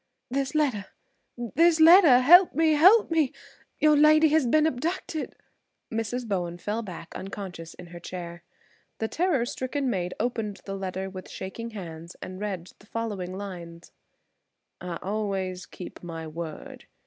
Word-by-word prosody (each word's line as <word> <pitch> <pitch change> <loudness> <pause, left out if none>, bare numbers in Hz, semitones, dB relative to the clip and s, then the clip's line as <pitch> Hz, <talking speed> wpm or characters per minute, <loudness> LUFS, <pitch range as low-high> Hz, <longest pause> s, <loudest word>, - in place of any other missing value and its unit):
"This 275 +2 -1
letter–this 290 +4 -1
letter! 320 -6 +8
Help 350 +6 +7
me–help 325 +7 +5
me! 315 -5 +2 0.5
Your 305 -1 +4
lady 310 +1 +6
has 305 -4 +3
been 305 +5 +4
abducted!" 320 +2 -3 0.6
Mrs. 225 +2 -3
Bowen 175 -4 -2
fell 210 +5 -3
back 175 -6 -9
unconscious 185 -4 -7
in 180 - -11
her 175 0 -10
chair. 170 -1 -7 0.6
The 220 - -2
terror 320 -4 +1
stricken 260 +2 -2
maid 180 -3 -2
opened 215 -5 -2
the 195 - -4
letter 190 0 -4
with 185 -1 -9
shaking 230 +5 -6
hands 170 -5 -9
and 185 0 -8
read 190 -4 -5
the 200 - -20
following 200 -6 -4
lines: 170 -4 -8 0.9
"I 175 -1 -4
always 195 -3 -3
keep 180 - -10
my 165 -2 -7
word. 160 0 -8
210 Hz, 135 wpm, -26 LUFS, 180-290 Hz, 0.9 s, letter